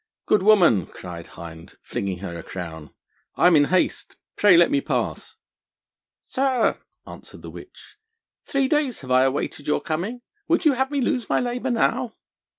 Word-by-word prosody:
'Good 210 - +3
woman,' 180 - +4
cried 85 -2 -9
Hind, 80 -1 -11
flinging 95 -2 -4
her 85 - -6
a 85 - -6
crown, 80 -4 -8 0.5
'I - - +2
am 175 - +4
in 145 - +6
haste; 180 +3 0 0.2
pray 205 -4 +6
let 175 +9 +5
me 285 -1 +2
pass.' - - -3 0.8
'Sir,' 260 -3 0 0.3
answered - - -12
the - - -8
witch, - - -14 0.5
'three 275 -1 +1
days 285 - 0
I 130 0 +3
have 135 - +4
awaited 140 +1 -4
your 150 - +1
coming. 190 +10 -4 0.3
Would 335 +1 +1
you 300 - +5
have 265 +1 0
me 285 -1 -1
lose 250 -4 -1
my - - +2
labour 245 +1 -2
now?' 240 0 0
190 Hz, 165 wpm, -23 LUFS, -, 0.8 s, in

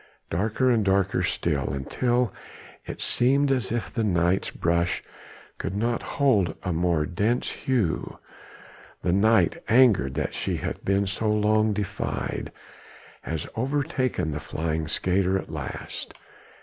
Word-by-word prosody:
Darker 110 +8 +1
and 115 -3 +3
darker 95 -1 +2
still, 75 -6 0
until 120 - 0 0.5
it - - -5
seemed 135 +3 +2
as 125 -7 0
if 120 -3 -3
the 115 - 0
night's 90 -2 +2
brush 85 +2 0 0.6
could 95 - -3
not 115 +3 0 0.2
hold 105 - +3
a 90 - -1
more 85 -2 +1
dense 105 +9 0
hue. 115 -11 -1 0.9
The 90 - +2
night 110 +4 +3
angered 110 - +4
that - - -2
she - - -2
hath - - -4
been 100 +1 +2
so 100 +3 -1
long 105 +1 +3
defied 105 -2 -3 0.7
has 80 -1 -4
overtaken 130 - -1
the 75 - -3
flying 80 0 -2
skater 95 +2 +1
at - - -6
last. - - -6
100 Hz, 130 wpm, -26 LUFS, 85-120 Hz, 0.9 s, angered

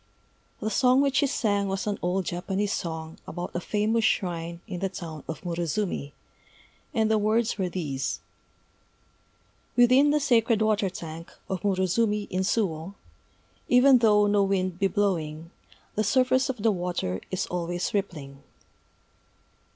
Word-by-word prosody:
The 220 - -2
song 255 +4 +4
which 275 -2 +1
she 285 - +4
sang 205 -6 0
was 195 0 -2
an 205 -1 -2
old 180 +1 0
Japanese 195 +4 -2
song 160 -1 -5
about 175 +1 -5
a - - 0
famous 215 +4 0
shrine 170 -4 -1
in 185 -5 -6
the 195 +1 -1
town 160 -5 -7
of 160 - -6
Murozumi; 170 -2 -2 0.8
and 220 -6 +1
the 220 - +3
words 215 +1 +1
were 185 -2 0
these: 145 -7 -3 1.6
_Within 255 +4 +6
the 300 - +3
sacred 235 -5 +3
water 215 -2 +2
tank 165 -2 -8 0.2
of 190 -2 -3
Murozumi 205 +2 +1
in 185 - 0
Suwô, 190 -3 -1 0.7
Even 250 +1 +6
though 210 -2 +5
no 205 0 +3
wind 185 -2 0
be 195 - +3
blowing, 170 -6 -1 0.4
The 215 - 0
surface 255 +5 +2
of 245 -6 -4
the 225 - +4
water 175 - -2
is 185 0 -1
always 175 0 -3
rippling. 150 -9 -4
195 Hz, 145 wpm, -26 LUFS, 175-220 Hz, 1.6 s, Within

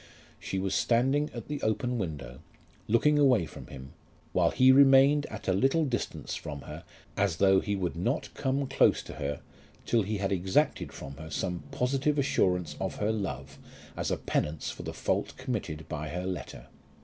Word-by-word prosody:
She 95 - -4
was 95 0 -1
standing 135 +5 +2
at 120 -3 -8
the 145 -1 -4
open 120 +3 0
window, 70 - -5 0.5
looking 145 +7 +3
away 125 - +4
from - - -11
him, 65 0 -10 0.4
while - - +3
he 130 0 +5
remained 140 +2 +6
at 110 - -8
a 95 - +3
little 135 - +2
distance 125 -4 -3
from 70 -1 -6
her - - -9 0.3
as 95 -4 +1
though 95 0 +5
he 100 +1 -2
would 90 -4 -2
not 115 - -2
come 135 0 -1
close 135 - +3
to - - -9
her 70 0 -3 0.4
till 115 - +2
he 105 +1 -2
had 100 0 -1
exacted 95 - +1
from 70 0 -9
her 80 +1 -9
some 90 0 -3
positive 135 +4 0
assurance 90 - +1
of - - -2
her 105 +1 0
love 105 -3 -4 0.4
as - - -2
a - - 0
penance 75 +1 -2
for - - -9
the - - -5
fault - - -2
committed 100 - -4
by 80 -1 -4
her 90 +3 -4
letter. 95 -2 -5
105 Hz, 180 wpm, -29 LUFS, 85-135 Hz, 0.5 s, remained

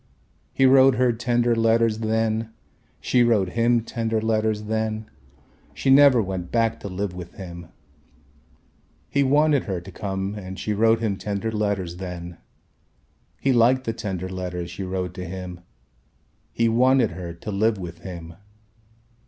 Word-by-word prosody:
He 135 - +2
wrote 130 0 +6
her 125 -1 +2
tender 120 0 +1
letters 115 -1 +2
then, 110 0 -1 0.5
she 125 - +2
wrote 110 -6 +3
him 115 +3 +2
tender 115 -1 -2
letters 110 -1 0
then, 110 0 -3 0.6
she 135 - +1
never 135 -4 +7
went 95 -2 -5
back 115 -1 +1
to - - -7
live 95 0 -3
with 90 -1 -9
him. 85 -3 -9 1.4
He 140 - +1
wanted 145 +1 +3
her 95 -4 -2
to 90 +3 -11
come 95 +1 -3
and 95 -2 -7
she 105 - -2
wrote 115 +2 +3
him 105 -4 -1
tender 105 +2 -3
letters 100 -5 -2
then. 85 -2 -7 1.0
He 135 - +2
liked 125 +2 +4
the 115 - -2
tender 95 -5 -4
letters 90 -2 -5
she 100 - -7
wrote 90 -1 -3
to 90 0 -6
him. 90 0 -7 0.9
He 115 - +1
wanted 125 +1 +3
her 90 -2 -6
to 105 +5 -7
live 105 +2 +1
with 85 -2 -8
him. 85 -2 -8
110 Hz, 150 wpm, -23 LUFS, 95-115 Hz, 1.4 s, never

